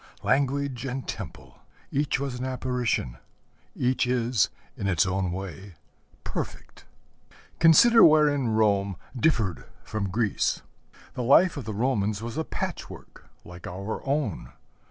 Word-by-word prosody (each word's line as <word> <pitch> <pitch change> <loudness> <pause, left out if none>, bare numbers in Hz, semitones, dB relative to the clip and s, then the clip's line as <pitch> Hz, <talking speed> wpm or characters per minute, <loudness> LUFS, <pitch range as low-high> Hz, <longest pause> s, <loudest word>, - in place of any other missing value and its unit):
Language 140 -2 0
and 130 0 -4
temple - - -8 0.3
each 140 0 0
was 135 -3 -4
an - - -4
apparition; 125 - -1 0.6
each 125 0 +1
is, 120 -8 +1 0.3
in 100 - -3
its 90 -5 +3
own 95 -1 -1
way, 95 0 -7 0.5
perfect. - - -6 0.7
Consider 225 +9 +7
wherein 150 -4 +5
Rome 100 -3 +2 0.2
differed 115 - +1 0.2
from 105 -3 -3
Greece. 110 +2 0 0.5
The - - -4
life 155 +9 +5
of 140 -6 -6
the 110 - -4
Romans 110 -4 0
was 115 +2 -6
a 160 - -1
patchwork, - - -7 0.2
like 90 0 -10
our 100 +5 -5
own. 135 - -2
120 Hz, 125 wpm, -26 LUFS, 100-135 Hz, 0.7 s, Consider